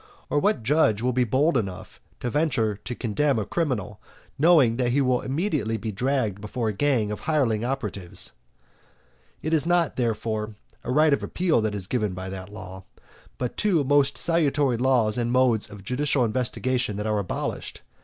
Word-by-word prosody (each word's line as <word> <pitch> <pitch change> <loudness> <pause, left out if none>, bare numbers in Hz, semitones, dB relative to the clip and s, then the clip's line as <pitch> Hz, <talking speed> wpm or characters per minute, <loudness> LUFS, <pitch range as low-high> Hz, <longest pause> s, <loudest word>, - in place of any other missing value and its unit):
or 145 - +3
what 200 - +1
judge 115 -5 +2
will 125 0 +1
be 125 +1 +3
bold 135 +8 +2
enough 95 -6 -4 0.2
to - - -3
venture 135 -9 +1
to 120 +5 -7
condemn 130 +5 0
a 105 - -1
criminal, 130 - -2 0.4
knowing 145 -8 +5
that 125 -1 +1
he 140 - +3
will 130 -2 +2
immediately 135 - -1
be 110 +1 -4
dragged 115 -2 -1
before 110 +2 -2
a - - -2
gang 115 -3 +1
of 105 - -4
hireling 125 -9 +1
operatives? 105 -8 -4 1.1
It 155 - -1
is 160 0 +2
not, 175 -3 +2
therefore, 110 -2 -2 0.3
a 125 - -3
right 150 +2 +4
of - - +1
appeal 175 -9 +1
that 110 -1 -1
is 100 -3 -3
given 105 -3 -1
by 95 +1 -6
that 95 +1 -8
law, 95 -3 -9 0.5
but 125 -1 -4
two 185 -8 +2
most 140 0 +3
salutary 145 -6 +2
laws 120 -3 +2
and 120 0 0
modes 125 -4 +3
of 100 -1 -11
judicial 130 +2 +1
investigation 125 -1 -1
that 105 - -3
are 105 -1 +1
abolished. 95 - -4
125 Hz, 175 wpm, -25 LUFS, 105-145 Hz, 1.1 s, knowing